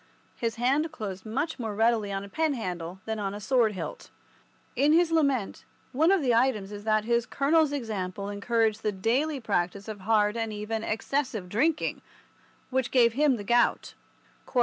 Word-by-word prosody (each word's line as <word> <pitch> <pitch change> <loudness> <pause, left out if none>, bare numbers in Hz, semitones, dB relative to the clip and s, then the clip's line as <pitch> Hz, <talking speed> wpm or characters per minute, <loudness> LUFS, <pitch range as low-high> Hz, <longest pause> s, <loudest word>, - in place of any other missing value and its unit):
His 230 -2 -2
hand 275 +7 +1
closed 200 -8 -6
much 290 +8 -2
more 220 -3 -3
readily 225 -2 +2
on 195 0 -3
a - - -8
pen 310 +6 0
handle 180 -4 -5
than 220 -1 -3
on 200 -1 -3
a - - -6
sword 225 0 +2
hilt. 165 -5 -7 0.7
In 285 +4 +4
his 335 0 +4
lament, 280 -10 +1 0.3
one 315 +6 +3
of 390 -6 +3
the 250 -3 +3
items 230 -5 +1
is 205 0 -8
that 215 -1 +2
his 235 +1 +1
colonel's 300 +2 +2
example 200 -7 -4
encouraged 220 +1 0
the 210 - 0
daily 255 +10 0
practice 195 -3 -2
of 215 -2 -6
hard 210 +1 +2
and 225 -1 -2
even 215 +1 -4
excessive 225 -3 -2
drinking, 295 - 0 0.7
which 260 -1 0
gave 235 -3 +4
him 285 +1 +3
the 210 - -6
gout. 240 +4 +2
225 Hz, 170 wpm, -27 LUFS, 205-265 Hz, 0.7 s, In